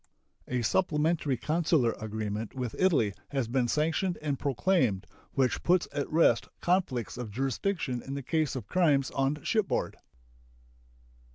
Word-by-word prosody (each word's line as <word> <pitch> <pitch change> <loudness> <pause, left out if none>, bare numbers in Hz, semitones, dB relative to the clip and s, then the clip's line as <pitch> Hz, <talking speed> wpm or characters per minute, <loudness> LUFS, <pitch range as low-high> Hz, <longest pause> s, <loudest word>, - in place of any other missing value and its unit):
A 125 -1 -1
supplementary 150 0 +1
consular 155 -3 +2
agreement 110 +1 -4
with 125 -3 -4
Italy 150 - +3 0.2
has 135 -5 -1
been 125 +1 +1
sanctioned 165 +6 0
and 145 -3 -2
proclaimed, 135 - +1 0.3
which 130 -2 +1
puts 180 0 +3
at 145 - -2
rest 165 +2 +4
conflicts 170 - 0
of 120 -3 -4
jurisdiction 135 - -2
in 135 - -6
the 140 - -4
case 155 -1 0
of 125 -6 -4
crimes 145 - +2
on 135 +2 -1
shipboard. 215 -4 0
140 Hz, 130 wpm, -29 LUFS, 120-165 Hz, 0.3 s, rest